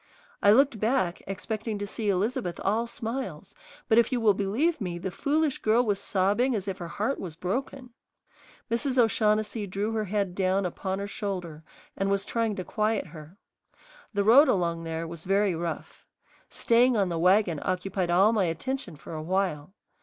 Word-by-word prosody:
I 205 - +6
looked 265 0 +4
back, 215 -6 0
expecting 215 +2 -4
to 205 - -4
see 210 +1 -3
Elizabeth 190 -3 -1
all 220 +4 +1
smiles, 235 +3 -5 0.3
but 225 -1 +5
if 235 - +2
you 250 - +1
will 220 -3 +4
believe 230 - 0
me 175 -3 -3
the 185 +2 -4
foolish 295 - 0
girl 230 +3 +3
was 205 -3 0
sobbing 205 +7 +1
as 200 -2 -3
if 195 -1 -4
her 175 - -5
heart 215 +10 -2
was 170 -5 -6
broken. 250 +8 -4 0.8
Mrs. 260 +3 0
O'Shaughnessy 215 -2 +2
drew 200 +4 -2
her 220 -1 -1
head 200 -2 -1
down 190 +1 +1
upon 190 +2 -3
her 200 - -3
shoulder 180 -6 -5 0.3
and 195 0 -1
was 200 0 0
trying 230 -3 -1
to 185 - -4
quiet 215 +2 -1
her. 155 +3 -12 0.7
The 200 -1 0
road 255 +9 +7
along 170 -7 0
there 165 0 -4
was 165 -1 -8
very 195 0 +2
rough. 165 -1 -6 0.4
Staying 240 +1 +3
on 195 -3 +2
the 170 -1 -2
wagon 180 -2 +3
occupied 185 0 -2
all 195 +6 +4
my 205 -4 +2
attention 175 - -3
for 150 - -10
a 155 - -4
while. 180 -2 -1
200 Hz, 175 wpm, -27 LUFS, 180-225 Hz, 0.8 s, road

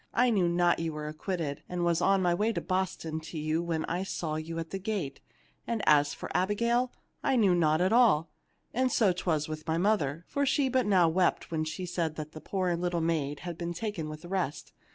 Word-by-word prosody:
I 245 +1 +4
knew 185 -5 +3
not 175 0 +3
you 165 -1 -2
were 150 0 -5
acquitted, 155 -1 -3
and 175 -1 -1
was 170 -1 +2
on 195 -1 +3
my 175 -1 +3
way 210 +6 +1
to - - -1
Boston 185 -4 -2
to 160 +1 -8
you 155 +2 0
when 165 -2 -2
I 175 +2 -2
saw 170 -4 -3
you 155 +2 -4
at 165 -1 -5
the 195 - -3
gate. 190 -8 -3 0.5
And 230 -3 -1
as 145 -1 +5
for - - -6
Abigail, 235 +6 +1 0.3
I 270 - +2
knew 205 -7 +4
naught 160 -2 +3
at 185 +4 +3
all; 200 -11 +4 0.4
and 255 +1 +1
so 210 -5 +4
'twas 160 -4 -1
with 155 +1 -6
my 160 0 +1
mother, 170 -5 +1
for 285 - -1
she 280 -1 +2
but 255 -3 +1
now 185 -4 +5
wept 175 +1 +1
when 155 -1 -1
she 180 +4 -4
said 170 -3 -2
the 155 - -4 0.2
poor 185 -3 -1
little 175 0 -1
maid 155 -3 -1
had 175 -2 -6
been 175 0 -3
taken 170 -5 -3
with 155 +1 -8
the - - -8
rest. 175 -6 -3
175 Hz, 220 wpm, -29 LUFS, 160-195 Hz, 0.5 s, as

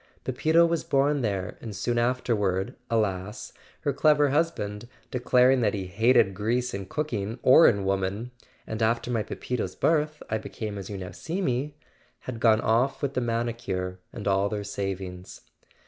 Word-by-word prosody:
Pepito 160 +6 +3
was 170 -1 0
born 140 +1 +2
there 100 -5 -2
and 110 -3 -7
soon 120 +2 0
afterward, 110 -6 0 0.2
alas, 105 -1 -2 0.3
her 145 -3 0
clever 150 0 +4
husband, 120 -9 -1 0.2
declaring 125 +1 +4
that 105 -2 +1
he 95 -2 -3
"hated 110 +2 +3
grease 120 +5 -1
in 100 -1 -5
cooking 115 -6 -3
or 130 +6 +8
in 100 -4 +2
woman" 95 +5 -1 0.3
("and 110 +1 -5
after 115 +2 +1
my 115 -2 +1
Pepito's 105 -3 -4
birth 155 -1 +1
I 110 0 -1
became 105 -1 -6
as 95 - -8
you 100 - -5
now 95 -1 -6
see 170 +4 -5
me"), 140 -3 -1 0.5
had 125 -3 -6
gone 110 -2 +4
off 120 +6 +1
with 140 -1 0
the 125 - 0
manicure 115 -6 -2
and 105 - -6
all 100 +1 +2
their 105 -1 -3
savings. 95 -2 -5
115 Hz, 160 wpm, -26 LUFS, 100-130 Hz, 0.5 s, or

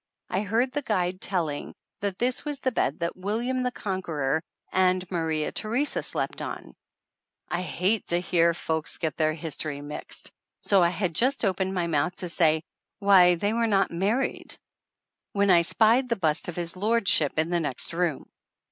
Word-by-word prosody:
I 190 - +1
heard 225 +5 +1
the 290 +2 -2
guide 185 -7 -1
telling 165 -7 -2 0.2
that 200 -2 -2
this 250 +1 0
was 295 -1 -3
the 260 -1 -1
bed 155 - -1
that 170 - -1
William 225 +7 -2
the 250 0 0
Conqueror 165 - -2 0.3
and 185 0 +2
Maria 160 -3 -1
Theresa 240 +7 0
slept - - -3
on! - - -6 0.8
I 175 - -1
hate 185 +4 0
to 175 - +1
hear 170 -2 +2
folks 160 -1 -3
get 160 -2 -2
their 155 -1 +1
history 155 -2 -4
mixed, 145 +1 -4 0.3
so 195 -2 +4
I 170 - +4
had 180 -1 -2
just 255 - +2
opened 190 0 0
my 175 -2 0
mouth 165 +2 0
to 180 - -5
say 160 -2 +2 0.3
"Why, 190 -4 +6
they 205 +5 -1
were 230 0 +1
not 195 -3 +2
married" 205 +10 -1 0.8
when 200 -1 +3
I 175 -1 +7
spied 225 +8 +3
the 235 - +2
bust 160 -6 +1
of 175 - -5
his 170 0 -3
lordship 200 -8 +2
in 160 +2 +1
the 175 - +2
next 145 -1 -1
room. 170 -4 -1
180 Hz, 175 wpm, -26 LUFS, 165-215 Hz, 0.8 s, I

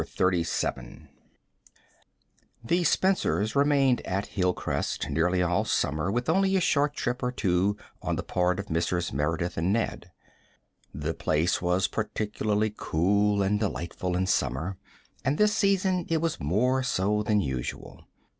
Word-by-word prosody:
CHAPTER 90 -1 +1
XXXVII 60 -6 -4 1.5
The 175 +9 +1
Spencers 160 - +1
remained 140 -3 +3
at 95 +2 -3
Hilcrest 90 -7 -1
nearly 90 +4 +2
all 90 +4 +1
summer 80 -4 0
with 120 +3 -1
only 190 +4 +2
a - - +4
short 145 -4 +1
trip 125 +1 -2
or 125 - 0
two 100 -3 +1 0.2
on - - -1
the - - -3
part 90 0 0
of 100 - -4
Mrs. 85 0 -1
Merideth 80 +5 -1
and 85 +4 +1
Ned. 115 +2 -2 0.8
The 75 +3 -3
place 80 +3 0
was 90 +1 +1
particularly 105 -1 -1
cool 100 +5 +1
and 105 +2 +1
delightful 90 -3 -2
in 95 - +1
summer, 80 - -1 0.4
and 140 +3 +1
this 210 0 +3
season 190 -4 +1
it 165 - +2
was 165 0 -1
more 115 - +1
so 105 -4 0
than 105 0 +2
usual. 65 -7 -5
100 Hz, 140 wpm, -27 LUFS, 90-125 Hz, 1.5 s, a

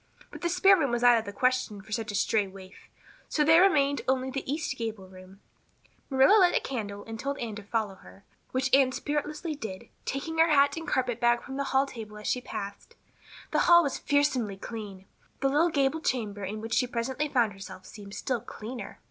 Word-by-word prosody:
But - - -10
the 345 - 0
spare 375 +3 +6
room 305 -7 0
was 240 0 -1
out 240 -1 +7
of 220 - -7
the 200 - -5
question 255 -1 0
for 215 +3 -15
such 215 0 -2
a - - -5
stray 205 0 +1
waif, 190 0 -14 0.4
so 300 - +2
there 320 +3 +6
remained 285 -7 +3
only 260 0 0
the 270 0 -4
east 300 +2 -2
gable 220 -4 -5
room. 185 +1 -15 0.7
Marilla 270 +10 +6
lighted 360 -2 +5
a - - +2
candle 205 -6 -5
and 225 0 -7
told 280 +2 -3
Anne 230 -2 -4
to - - -7
follow 210 -1 -2
her, 195 +1 -16 0.3
which 260 0 -1
Anne 270 -1 +5
spiritlessly 300 +4 -3
did, 220 -5 -7 0.2
taking 320 +4 -3
her 325 +1 +6
hat 285 -2 +4
and 325 -1 -6
carpet 245 -4 0
bag 240 0 +3
from 270 0 -7
the 280 - -1
hall 270 0 +2
table 220 -5 -9
as 210 - -10
she 250 - 0
passed. 200 - -7 0.6
The - - +2
hall 345 0 +8
was 280 - -2
fearsomely 260 -8 +1
clean; 200 -3 -8 0.3
the 270 - +2
little 305 +5 +3
gable 290 +1 +1
chamber 210 -8 -2
in 210 +3 -4
which 225 +1 -5
she 250 - +2
presently 250 +5 -2
found 235 -6 +2
herself 195 -1 -10
seemed 200 -2 -10
still 250 -4 -2
cleaner. 235 +4 -8
250 Hz, 210 wpm, -28 LUFS, 210-280 Hz, 0.7 s, hall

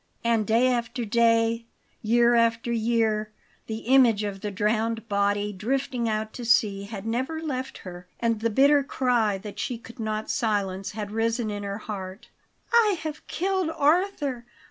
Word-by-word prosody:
And 230 -2 +1
day 230 +3 +3
after 240 -1 -1
day, 230 +1 +2 0.3
year 235 +2 +4
after 230 0 +2
year, 220 -2 +1 0.4
the 220 0 -4
image 240 -4 +5
of 200 -2 -4
the 210 - -3
drowned 225 +3 -1
body 205 0 0
drifting 240 +3 -1
out 215 0 -2
to 245 - -7
sea 210 -4 +2
had 200 -1 -7
never 260 +8 -2
left 265 -4 -4
her, 180 -1 -9
and 230 -2 0
the 230 +1 0
bitter 280 +5 +4
cry 245 -7 +1
that 205 +1 -9
she 245 - -2
could 230 +2 -14
not 215 -1 -3
silence 195 -6 -1
had 205 -1 -5
risen 225 0 0
in 205 0 -4
her 200 0 -4
heart: 195 -1 -7 0.4
"I 430 -5 +5
have 310 -1 -6
killed 375 -1 -1
Arthur! 295 -6 +1
230 Hz, 160 wpm, -26 LUFS, 210-250 Hz, 0.4 s, image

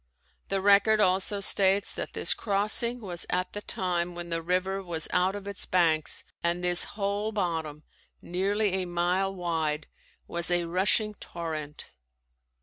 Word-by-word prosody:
The 195 -1 -1
record 205 +2 +5
also 195 +1 +2
states 195 0 +4
that - - -6
this - - +3
crossing 215 +4 +1
was 180 -5 -3
at 180 0 -2
the 205 - -5
time 175 -3 -2
when 175 0 -7
the 165 0 -1
river 185 +3 -1
was 170 -4 -2
out 185 +2 +2
of 200 -1 -8
its 200 -2 -8
banks 165 -4 +2 0.2
and 170 +1 0
this 175 0 +4
whole 205 +1 -1
bottom, 160 -7 -3 0.4
nearly 200 +3 -1
a - - -3
mile 180 +2 0
wide, 160 -5 -2 0.4
was 170 0 0
a 175 -1 +2
rushing 195 +5 +1
torrent. 155 -6 -7
180 Hz, 145 wpm, -27 LUFS, 170-200 Hz, 0.4 s, record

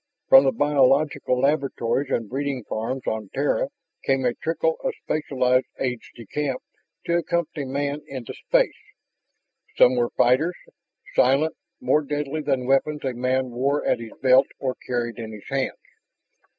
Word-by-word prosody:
From 135 +1 +9
the 135 - +4
biological 140 -2 +2
laboratories 135 -2 0
and 115 - -1
breeding 135 +1 -3
farms 115 +4 -3
on 110 -2 -3
Terra 145 - +1 0.3
came 135 -1 +1
a 120 - +2
trickle 170 - -1
of - - -1
specialized 130 -4 +1
aides 125 -3 -3
de 115 - -11
camp 140 +2 -3 0.4
to 170 - +2
accompany 165 -4 -2
man 140 +2 -2
into 130 -4 -7
space. - - +1 1.0
Some 125 - +6
were 120 -1 +1
fighters, 145 +9 +3 0.6
silent, 140 +5 +3 0.2
more 150 - +2
deadly 145 +1 -3
than 135 -4 0
weapons 140 +3 +1
a 130 - -1
man 130 +1 0
wore 140 +4 0
at - - +2
his 115 -1 -8
belt 130 0 +6
or 130 -2 -2
carried 120 -1 -2
in 110 -1 -6
his 105 - -11
hands. 135 -1 -1
135 Hz, 150 wpm, -24 LUFS, 125-145 Hz, 1.0 s, From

